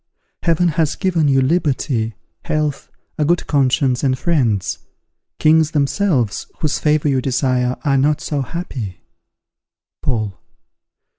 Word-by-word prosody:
Heaven 170 +1 +2
has 160 -2 0
given 175 -6 +1
you 135 -1 +3
liberty, 130 - 0 0.3
health, 150 -2 -2 0.3
a - - +3
good 170 +3 +1
conscience, 135 -2 +1
and 130 -2 +2
friends; 125 - 0 0.6
kings 155 0 +4
themselves, 140 - 0
whose 155 -2 0
favour 150 0 +2
you 135 -2 +2
desire, 130 -1 0
are 140 -2 +3
not 145 +2 +2
so 145 -2 -2
happy. 125 - -5 1.0
_Paul. 110 -5 -2
140 Hz, 120 wpm, -19 LUFS, 130-155 Hz, 1.0 s, kings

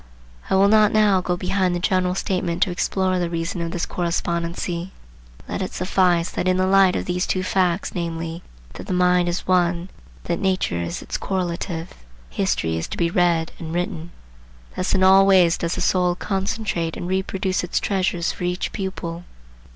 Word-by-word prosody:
I - - +2
will 195 +1 +5
not 215 0 +5
now 210 -3 +4
go 180 0 -1
behind 185 0 0
the - - -1
general 185 0 +1
statement 180 -3 0
to 190 - -1
explore 185 +1 0
the 175 -1 -1
reason 170 +1 -3
of 170 - -2
this 175 +1 -2
correspondency. 170 0 -2 0.6
Let - - -4
it - - -4
suffice 180 -2 +1
that 185 - -2
in 185 0 +3
the 185 - +2
light 190 -1 +5
of - - -2
these 180 +1 -1
two 185 - 0
facts, 185 -1 0
namely, 165 -1 -4 0.3
that - - -9
the - - -2
mind 180 -1 +3
is 175 - -3
One, 180 -1 +3
and 175 +2 -9 0.3
that 170 - -2
nature 185 - 0
is 85 0 -4
its - - -4
correlative, 175 -2 -3 0.4
history 80 +5 0
is 80 - -4
to - - -6
be 170 -1 +1
read 170 -2 +2
and 165 0 -5
written. 175 -2 -3 0.7
Thus 185 - 0
in 190 - +2
all 190 +1 +7
ways 180 -4 +5
does 170 0 -2
the - - -3
soul 180 -1 +2
concentrate 195 -4 -2
and 175 - -5
reproduce 190 0 -1
its 175 - -1
treasures 185 -3 0
for - - -8
each 180 +1 -2
pupil. 175 -3 -5
180 Hz, 185 wpm, -22 LUFS, 170-190 Hz, 0.7 s, all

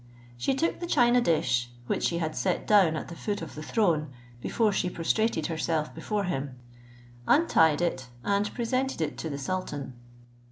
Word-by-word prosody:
She 120 - 0
took 330 +5 0
the 345 - -4
china 245 -5 +4
dish, 125 - +1 0.2
which - - -1
she 170 - +1
had 160 -2 -2
set 125 - 0
down 190 -7 +5
at - - -4
the 170 - -8
foot 205 0 -3
of 165 - -8
the 150 - -7
throne, 155 -6 +1 0.3
before 220 - +1
she 185 -2 0
prostrated 175 +1 0
herself 160 -1 -1
before 210 -2 -2
him; 140 -8 -3 0.7
untied 160 - +4
it, 130 -7 -1 0.2
and 200 +1 +1
presented 255 +1 -1
it 160 - -1
to 160 - -3
the 140 - -4
sultan. 145 -3 -4
170 Hz, 170 wpm, -28 LUFS, 155-215 Hz, 0.7 s, down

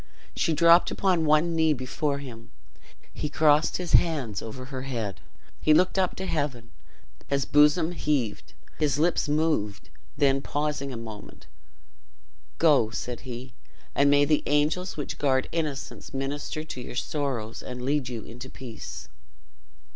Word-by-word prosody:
She 165 - +1
dropped 170 +2 +6
upon 180 -4 +1
one 155 +2 +3
knee 160 -1 +4
before 140 +2 -2
him. 115 -5 -10 0.6
He 150 - -3
crossed 150 0 +3
his 180 -2 -4
hands 135 - +2
over 125 +3 -7
her 130 -1 -6
head 115 -7 -4 0.4
he 155 - +5
looked 185 +3 +3
up 185 -2 +1
to 190 - -5
heaven 135 -9 -2 0.6
his 140 -1 0
bosom 150 +3 +4
heaved 145 -10 -2 0.2
his 145 -3 +2
lips 160 -1 +1
moved 145 -10 0 0.3
then 135 -2 +3
pausing 145 -1 -2
a 125 - -5
moment 110 -2 -10 1.1
"Go," 145 -9 +4
said 120 +2 -5
he, 125 +1 -7 0.4
"and 140 0 +4
may 145 0 +5
the 150 0 +2
angels 150 +6 +1
which 145 - -5
guard 130 -2 +2
innocence 150 -4 -4
minister 145 +3 -3
to 140 -5 -7
your 125 - -8
sorrows, 125 -5 -3
and 125 -1 -7
lead 140 -1 0
you 115 -3 -5
into 125 +2 -9
peace!" 120 -4 -8
145 Hz, 145 wpm, -26 LUFS, 125-155 Hz, 1.1 s, dropped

